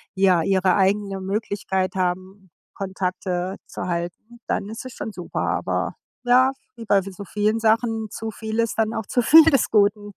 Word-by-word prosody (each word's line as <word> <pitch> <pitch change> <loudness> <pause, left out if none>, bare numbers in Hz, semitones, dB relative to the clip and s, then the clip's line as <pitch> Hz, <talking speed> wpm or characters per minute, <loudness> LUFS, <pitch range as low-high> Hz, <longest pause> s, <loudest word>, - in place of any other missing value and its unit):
ja, 190 -3 +4
ihre 190 +1 +2
eigene 195 0 +1
Möglichkeit 195 -1 -2
haben, 185 +1 -3 0.2
Kontakte 185 -1 -3
zu - - -6
halten, 175 +7 -5
dann 200 - -2
ist 225 +4 -7
es 255 - -8
schon 220 - -6
super. 180 -4 -5
Aber - - -1 0.3
ja, 255 +2 +5 0.2
wie 230 -1 -9
bei 200 -2 +3
so 195 +1 -8
vielen 210 +3 0
Sachen, 225 -1 +1
zu 220 0 -5
viel 220 +1 -5
ist 230 -1 0
dann 220 0 +1
auch 220 - -3
zu 245 - +1
viel 315 +7 +8
des 280 -7 +3
Guten. 205 0 +2
205 Hz, 170 wpm, -23 LUFS, 190-225 Hz, 0.3 s, viel